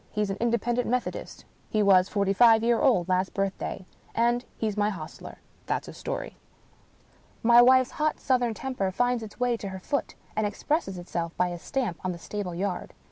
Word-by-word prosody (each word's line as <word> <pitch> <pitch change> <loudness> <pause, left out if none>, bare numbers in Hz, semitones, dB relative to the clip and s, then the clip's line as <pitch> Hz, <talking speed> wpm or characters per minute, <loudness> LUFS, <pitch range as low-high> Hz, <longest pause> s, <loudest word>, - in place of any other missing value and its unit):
He's 210 -2 -1
an 195 - -4
Independent 235 +1 0
Methodist. 250 0 -3 0.2
He 215 -1 +2
was 190 -1 +5
forty 200 -2 +1
five 225 +1 +6
year 235 0 +3
old 185 -10 +3
last 185 0 0
birthday. 195 -1 -3 0.3
And 240 +1 +2
he's 215 -2 -1
my 210 0 +2
hostler. 165 -6 -8 0.3
That's - - -1
his - - -10
story." - - -5 1.1
My 235 +1 +8
wife's 255 +1 +5
hot 305 0 -1
southern 245 -4 +1
temper 250 -6 -2
finds 245 +5 +1
its 220 +1 -10
way 245 -1 +1
to 200 - -6
her 190 0 -6
foot, 280 +9 -2 0.2
and 215 -1 +1
expresses 205 - -2
itself 170 -1 -4
by 180 - +2
a 175 -1 -6
stamp 245 - -3
on 185 -1 -1
the - - -8
stable 185 0 -5
yard. 185 0 -3
215 Hz, 185 wpm, -27 LUFS, 190-245 Hz, 1.1 s, My